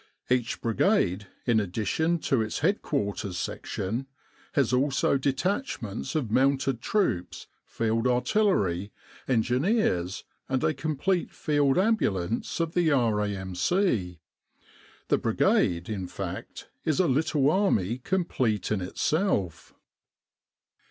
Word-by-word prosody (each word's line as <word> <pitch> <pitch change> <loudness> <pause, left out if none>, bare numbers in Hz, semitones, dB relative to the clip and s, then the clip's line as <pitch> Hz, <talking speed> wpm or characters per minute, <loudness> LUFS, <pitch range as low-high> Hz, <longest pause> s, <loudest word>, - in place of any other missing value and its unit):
Each 125 -2 +1
Brigade, 110 - +1 0.2
in 115 -3 +3
addition 110 - 0
to 130 -4 +1
its 110 +4 -3
head 195 +7 +2
quarters 100 - -2
section, 115 +8 -3 0.5
has 130 -4 +2
also 135 +1 +2
detachments 135 - -2
of 130 -9 -1
mounted 135 -1 +2
troops, 120 - -1 0.2
Field 115 +1 0
Artillery, 125 - +1 0.4
Engineers, 125 - +1 0.3
and 130 -1 0
a 155 - +2
complete 155 +5 -1
Field 145 -2 +1
Ambulance 115 - 0
of 165 -1 -1
the 175 -3 +2
R.A.M.C. 105 - 0 0.9
The - - +4
Brigade, 85 0 +2
in 95 -4 -4
fact, - - -7 0.2
is 155 0 0
a 185 - +4
little 145 0 +2
Army 125 - +1
complete 130 - -1
in 105 -3 0
itself. 100 - -1
125 Hz, 105 wpm, -27 LUFS, 105-160 Hz, 0.9 s, The